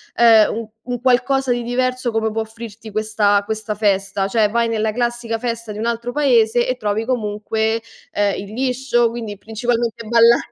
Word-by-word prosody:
ehm, 225 -2 +6
u 225 -1 -6
un 245 -1 -4
qualcosa 260 +1 +2
di 240 0 0
diverso 255 0 -1
come 220 0 0
può 225 +1 -1
offrirti 220 0 -9
questa 210 -1 +2
questa 220 0 -3
festa, 195 -1 0
cioè 210 0 +2
vai 235 +1 +1
nella 220 -1 0
classica 240 -1 -2
festa 230 -2 -4
di 210 - -7
un 230 - -1
altro 235 +1 -2
paese 240 -4 +3
e 255 - 0
trovi 215 -1 -1
comunque, 220 -1 -1 0.3
ehm, 205 -1 +1
il 200 +1 -8
liscio, 250 -1 +1
quindi 225 -3 -6
principalmente 230 +1 -2
balla 235 +1 +6
230 Hz, 170 wpm, -19 LUFS, 215-240 Hz, 0.3 s, ehm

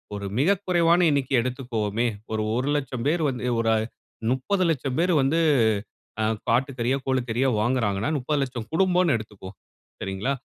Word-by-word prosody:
ஒரு 100 0 -5
மிக 185 +9 +4
குறைவான 175 -1 +3
எண்ணிக்கை 140 -2 +1
எடுத்துக்கொவோமே. 120 -3 -2 0.2
ஒரு 110 -1 -1
1,00,000 135 -1 -1
பேர் 160 +2 +1
வந்து 125 -1 -4
ஒரு 115 - +1
அ - - +2 0.5
30,00,000 145 -1 0
பேரு 180 +1 +2
வந்து 145 +5 +2 0.8
ஆ - - +1 0.3
ஆட்டு 130 +3 +1
கறியோ, 120 +3 +1
கோழி 130 -1 +1
கறியோ 125 +4 +1
வாங்குறாங்கன்னா, 110 -2 0
30,00,000 130 -4 -2
குடும்போம் 180 -2 +3
எடுத்துக்குவோம். 105 -3 -10 0.5
சரிங்களா? 95 +7 -2
130 Hz, 140 wpm, -25 LUFS, 115-150 Hz, 0.8 s, மிக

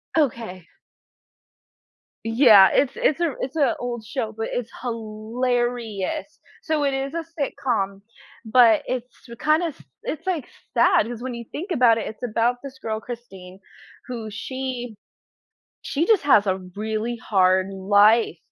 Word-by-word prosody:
Okay. 225 - -1 1.6
Yeah, 225 -4 +7
it's 275 -2 +2
it's 310 - +1
a 325 -6 0
it's 265 +3 -4
a 295 -3 +2
old 240 -2 -4
show, 220 0 -3
but 225 0 -3
it's 245 -2 -3
hilarious. 240 +2 -3 0.2
So, 310 -2 0
it 280 -1 +1
is 270 +1 -3
a 335 0 -2 0.2
sitcom, 205 -8 -1 0.4
but 225 -1 +5
it's, 250 -1 -2 0.2
sw 235 -1 -11
kinda 310 +3 +2
s 310 - -9 0.2
it's 310 - -5
like 335 -9 -1 0.3
sad 235 -3 +4
'cause 240 -1 -6
when 255 0 -4
you 235 - -7
think 365 +6 -6
about 245 -7 +4
it, 225 - -3
it's 220 +3 -9
about 235 +1 +1
this 270 -1 -9
girl 220 -3 -3
Christine 195 -6 -10 0.5
who 230 -4 -5
she 250 0 -5 0.9
she 310 +4 -1
just 440 -5 +4
has 240 -8 +5
a 190 -1 +1 0.2
really 220 +3 -2
hard 190 -4 +2
life, 205 0 +4
235 Hz, 145 wpm, -23 LUFS, 215-265 Hz, 1.6 s, Yeah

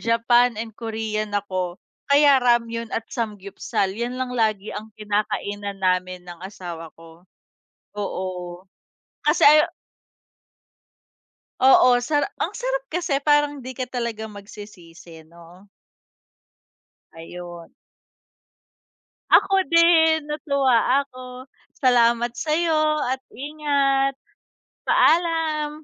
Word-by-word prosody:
Japan 230 0 +2
and 225 0 -6
Korean 220 -1 -4
ako, 185 -3 -3 0.3
kaya 285 -1 +5
ramyeon 230 -1 +1
at 225 - -4
samgyupsal. 200 -3 -3
'Yan 240 +4 -4
lang 255 -1 -4
lagi 215 -4 -1
ang 215 +1 -7
kinakainan 205 -1 -3
namin 185 -1 -1
ng 175 -1 -11
asawa 175 -4 -8
ko. 165 0 -16 0.8
Oo, 180 -3 -5 0.6
kasi 300 +1 +3
ayaw 305 +1 +6 1.9
Oo, 255 -1 +6
sara 290 +4 0 0.2
ang - - -3
sarap - - -3
kasi 320 - -1
parang 295 0 +2
'di 260 0 -8
ka 255 0 -4
talaga 230 -3 -4
magsisisi 180 -6 -13
'no? 170 +3 -17 1.5
Ayun. 175 +1 -10 1.6
Ako 390 - +5
din, 325 -2 +4
natuwa 280 -3 +1
ako. 255 -1 -11 0.3
Salamat 240 -1 +3
sa'yo 315 +4 0 0.3
at 260 - -3
ingat. 275 -1 0 0.7
Paalam. 315 -3 +1
235 Hz, 95 wpm, -22 LUFS, 200-280 Hz, 1.9 s, ayaw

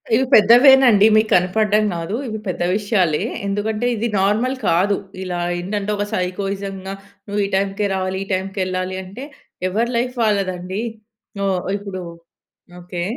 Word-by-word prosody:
ఇవి 260 +3 +2
పెద్దవేనండి. 240 0 +7
మీకు 215 0 +3
కనపడ్డంగాదు. 200 -1 +1
ఇవి 220 -1 -4
పెద్ద 180 -1 -3
విషయాలే. 200 -7 +1 0.2
ఎందుకంటే, 210 +3 -2
ఇది 230 +2 -1
నార్మల్ 220 +7 +1
కాదు. 190 +4 +2 0.3
ఇలా 180 -1 -3 0.2
ఏంటంటే, 205 +3 -3
ఒక 205 - -1
సైకోయిజం‌గా, 195 0 -3 0.3
నువ్వు 205 0 -1
ఈ - - -2
టైంకే 200 +1 0
రావాలి. 190 0 -2
ఈ - - -19
టైంకెళ్లాలి 185 -1 -2
అంటే, 200 +9 -9 0.4
ఎవరి 230 +6 0
లైఫ్ 250 +2 -1
వాళ్ళదండి. 190 -1 -1 0.7
ఓహ్! 185 -2 0 0.2
ఇప్పుడు 195 -2 -6 0.8
ఓకే. 175 0 -5
200 Hz, 130 wpm, -20 LUFS, 185-215 Hz, 0.8 s, పెద్దవేనండి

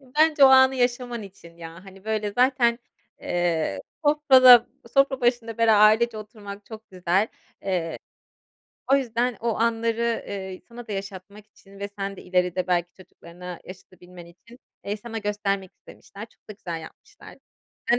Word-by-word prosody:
Iıı, 255 -2 -22
bence 310 -2 +5
o - - +10
anı 260 0 +6
yaşaman 245 -2 -1
için 170 -4 -14
ya. 165 +2 -11
Hani, 195 0 -15
böyle 215 -1 -2
zaten, 245 -1 +2 0.4
eee, 165 - -1 0.2
sofrada, 260 -5 +7 0.3
sofra 275 -1 +3
başında 240 -2 -1
bera 225 -2 +4
ailece 215 +2 +4
oturmak 205 -1 -10
çok 220 0 -12
güzel. 185 +1 +1
Eee, 220 - -4 1.6
o - - +7
yüzden 245 -2 -1
o 230 -1 -1
anları, 230 0 0
eee, 190 -2 -6
sana 235 0 -11
da 210 - -5
yaşatmak 195 +1 -8
için 195 -2 -19
ve 200 - -5
sen 195 0 -4
de - - -11
ileride 180 0 -1
belki 175 -1 0
çocuklarına 180 -1 -12
yaşatabilmen 180 -1 -14
için, 230 +8 -18 0.3
eee, 205 +1 -3
sana 225 +1 -7
göstermek 200 -2 -3
istemişler. 205 +2 -13
Çok - - -33
da - - -7
güzel 175 -5 -7
yapmışlar. 420 - -15 0.5
Ben 240 - +4
210 Hz, 155 wpm, -24 LUFS, 185-240 Hz, 1.6 s, o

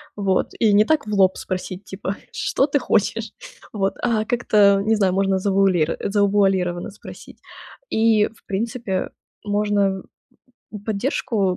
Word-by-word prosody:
Вот, 195 -2 0
и 215 -3 +4
не 210 +1 +5
так 310 -6 +1
в 210 - -4
лоб 190 -2 +3
спросить, 185 +1 -5
типа: 190 0 -5 0.2
"Что 270 - 0
ты 285 -1 0
хочешь?" 225 0 0 0.4
Вот, 195 -2 0
а 225 -3 0
как-то, 205 -4 +3
не 220 +2 +2
знаю, 195 -4 +1
можно 195 0 +1
завуалир 190 -4 +2
э, - - -3
завуалированно 195 -3 +1
спросить. 205 - -13 0.5
И, 220 -1 +3
в 225 - -20
принципе, 210 -1 -3 0.3
можно 205 -2 0 0.8
поддержку 210 -3 -1
200 Hz, 135 wpm, -21 LUFS, 190-215 Hz, 0.8 s, не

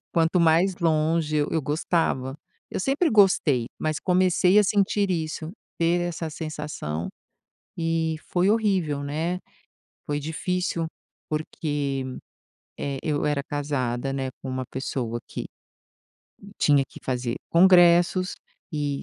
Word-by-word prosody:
Quanto 170 +1 +3
mais 170 +3 +4
longe 160 -2 +1
eu 145 0 +1
eu 160 - +1
gostava. 145 -3 0 0.3
Eu - - -3
sempre 285 - +1
gostei, 175 - +4
mas 155 -1 -1
comecei 185 +1 +4
a 210 - +6
sentir 200 0 +2
isso, 160 -2 -2 0.3
ter 170 +1 +2
essa 165 -2 -3
sensação, 150 - -4 0.7
e 165 -1 0
foi 180 +2 +2
horrível, 190 -10 +1
né. 160 +5 -2 0.7
Foi 145 0 -1
difícil, 170 +2 -2 0.4
porque, 145 -3 -2 0.8
eh, 140 -1 -2
eu 150 -2 0
era 145 -1 +1
casada, 135 -3 -2
né, 135 -1 -2
com 135 - -5
uma 130 0 -3
pessoa 125 -3 -3
que - - -5 1.2
tinha 145 -2 +4
que - - -13
fazer 125 -2 -2
congressos 175 0 +5 0.4
e 145 -2 -2
160 Hz, 120 wpm, -25 LUFS, 145-175 Hz, 1.2 s, a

